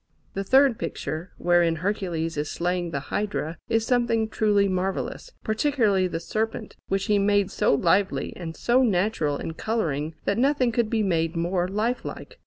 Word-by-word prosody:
The 195 - -2
third 265 +3 +4
picture, 160 +5 -4
wherein 175 -1 +3
Hercules 170 -2 -2
is 150 0 -2
slaying 175 0 -1
the 140 -3 -5
Hydra, 195 -6 -2
is 225 -1 +1
something 235 -2 +1
truly 205 -2 +2
marvellous, 190 - -2
particularly 215 -5 +2
the 165 -2 -3
serpent, 220 +6 -3
which 195 0 0
he 210 -2 +2
made 200 -1 +2
so - - +2
lively 185 +7 +1
and 165 -2 -7
so 245 +2 +3
natural 185 - +1
in 160 - -5
colouring 160 -7 -2
that 200 +3 +1
nothing 265 -2 +2
could 230 -1 0
be 220 -1 +1
made 165 -3 0
more 175 +2 0
life 215 +6 -1
like. - - -8
195 Hz, 165 wpm, -25 LUFS, 170-225 Hz, -, third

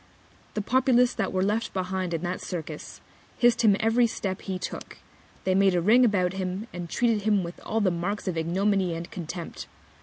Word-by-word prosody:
The 210 - -1
Populace 250 0 +3
that 210 -4 -2
were 185 0 +1
left 210 +3 -1
behind 185 -1 -2
in 165 - -4
the 180 +1 -2
Circus, 160 -4 -6 0.4
hiss'd 240 -1 +4
him 215 -4 +5
every 230 +2 +3
Step 195 -4 -4
he 190 -2 -3
took, 180 - -7 0.5
they 185 - +2
made 195 -1 +4
a - - +3
Ring 220 +9 +5
about 190 -6 +2
him, 190 +2 -3
and 175 -1 -6
treated 230 0 +1
him 205 -2 +2
with 170 +1 -7
all 225 0 -1
the 190 -3 +3
Marks 190 +5 -3
of 180 - -1
Ignominy 185 +2 +1
and 165 +1 -7
Contempt. 170 -1 -6
190 Hz, 190 wpm, -26 LUFS, 180-215 Hz, 0.5 s, him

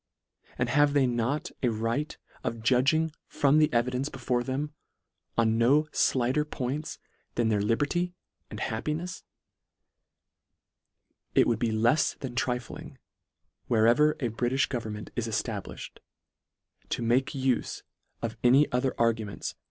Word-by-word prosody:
and 120 0 0
have 145 +2 +4
they 140 -2 +4
not 120 +4 -1
a 125 - +2
right 115 +7 -2 0.3
of 115 -1 -3
judging 140 +7 +3 0.2
from 145 +1 +3
the 155 - +4
evidence 125 +3 0
before 125 -1 -1
them, 140 +4 -3 0.6
on 115 -1 +3
no 145 +6 +4 0.3
(lighter 130 +4 +2
points 150 0 -4 0.4
than 120 -2 +2
their 105 -2 +2
liber 115 +7 +2
ty 175 +4 -1 0.4
and - - -7
happinefs? 155 +10 -3 2.1
It - - +6
would 115 -2 +1
be 120 - +1
lefs 115 +8 +2
than 130 -3 -6
trif 125 -1 -1
ling, - - -10 0.7
wherever 120 +7 +4
a 120 - -2
Britifh 125 +4 0
government 110 -4 -5
is 115 -1 -1
efta 115 -2 -2
bliftied, - - -10 0.9
to - - -2
make 125 +3 +2
ufe 130 -2 -1 0.4
of 115 -1 -2
any 130 +4 +6
other 125 +1 0
arguments 115 -3 0
LETTER - - -11
VI. - - -53
125 Hz, 140 wpm, -28 LUFS, 115-145 Hz, 2.1 s, It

